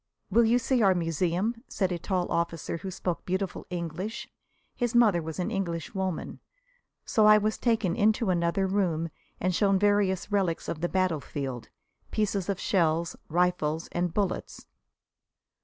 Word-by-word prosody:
"Will 230 +4 +5
you 235 +2 +4
see 255 0 +1
our 195 -3 +5
museum?" 180 - -1
said 190 -2 -1
a 175 - -2
tall 180 0 -1
officer, 170 -1 -1
who 190 +4 -6
spoke 180 -2 -3
beautiful 185 0 -3
English. 180 +4 -4 0.5
His 240 -1 -1
mother 215 -8 +5
was 160 0 -6
an 185 +4 -2
Englishwoman. 185 -1 -3 0.7
So 215 -3 +4
I 215 0 +8
was 215 +1 0
taken 225 -7 +1
into 215 -1 +2
another 170 +2 +1
room 180 -4 0 0.3
and 185 0 0
shown 195 +1 +3
various 205 -1 +2
relics 190 -5 0
of 155 - -4
the 175 - 0
battlefield 145 -9 -2 0.4
pieces 200 -3 -1
of 195 -2 -1
shells, 170 -2 +1
rifles 165 -2 0
and 175 0 -1
bullets. 200 0 -2
185 Hz, 145 wpm, -28 LUFS, 170-205 Hz, 0.7 s, I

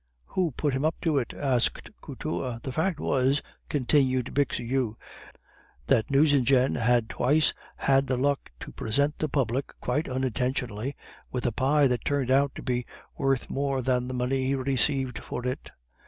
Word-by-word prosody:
"Who 180 -3 +2
put 145 -3 0
him 130 +2 -1
up 160 +1 +2
to 155 -4 +2
it?" 120 - -4
asked 130 -4 0
Couture. 115 +7 -4
"The 135 - -4
fact 160 +5 0
was," 135 +2 +1 0.3
continued 130 -2 +2
Bixiou, 125 -4 0 0.9
"that 110 - +2
Nucingen 135 -2 +4
had 120 -1 +2
twice 150 +7 +2 0.2
had 135 0 +2
the 130 - 0
luck 140 +2 0
to - - -7
present 140 +7 0
the 155 - -1
public 135 -1 -1
(quite 135 +5 -1
unintentionally) 130 -1 -2 0.4
with 125 - -3
a 120 - +2
pie 140 +5 +3
that 125 -2 +1
turned 140 -3 0
out 140 +1 +3
to - - -7
be 125 -1 -1 0.3
worth 135 -2 0
more 135 -1 -1
than 125 -1 +1
the 130 - -4
money 130 +1 0
he 135 - +1
received 130 -2 0
for 125 - -6
it. 125 0 -3
130 Hz, 160 wpm, -27 LUFS, 125-140 Hz, 0.9 s, Nucingen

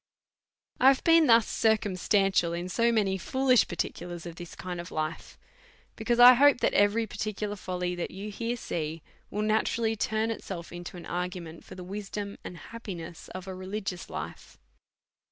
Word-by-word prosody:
I 260 - +6
have 270 -1 +5
been 330 -2 +6
thus 230 -1 +6
circumstantial 195 -4 +2
in 175 +1 -4
so 235 +4 +2
many 195 -4 +1
foolish 260 +4 +3
particulars 175 -1 -4
of 170 -1 -7
this 175 -1 -9
kind, 180 -1 -5 1.2
because 235 +2 0
I 245 +1 +11
hope 280 +2 +6
that - - +2
every 205 +3 +3
par 210 - -10
ticular 210 0 -3
folly 180 -2 -3
that 175 -1 -3
you 205 +2 -7 0.3
see 160 -8 -3
here 165 - -12 0.3
will 210 +1 -2
naturally 220 +1 +1
turn 220 +1 0
it 225 - -6
self 170 -3 -7
into 175 +1 -8
an 175 - -9
argument 175 -2 -5
for - - -11
the 185 - -8
wisdom 200 +1 -6
and 180 - -8
happiness 175 -7 -8
of 185 0 -6
a 190 - -6
religious 185 -1 -5
life. - - -7
195 Hz, 165 wpm, -28 LUFS, 180-220 Hz, 1.2 s, I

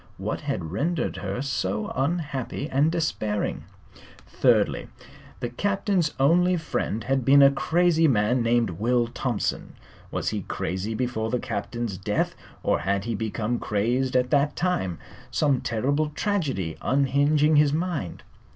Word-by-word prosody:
What - - -3
had 80 - -3
rendered 160 - -1
her 100 +6 -3
so 105 -6 -2
unhappy 140 -2 -2
and 145 +2 +2
despairing? 110 -11 -2 0.6
Thirdly, - - +2 0.5
the 120 - -2
Captain's 195 - 0
only 175 +6 +4
friend 115 -8 -2
had 135 0 0
been 140 +3 +7
a 140 - +7
crazy 165 +3 +2
man 120 0 +2
named 115 -3 +2
Will 120 +7 +1
Thompson. 120 -1 -3 0.3
Was - - -2
he - - -3
crazy 95 +6 -3
before 115 -2 -2
the 125 - 0
Captain's 105 -2 -4
death, 105 +1 -1 0.3
or - - +2
had 100 +2 -1
he 115 - -2
become 110 +2 -2
crazed 120 +6 0
at 125 0 +2
that 145 0 +2
time, 95 - -1 0.3
some 140 -5 +1
terrible 140 +7 0
tragedy 145 - -2
unhinging 145 +3 +3
his 145 -1 +5
mind? 160 - -3
130 Hz, 135 wpm, -25 LUFS, 110-150 Hz, 0.6 s, been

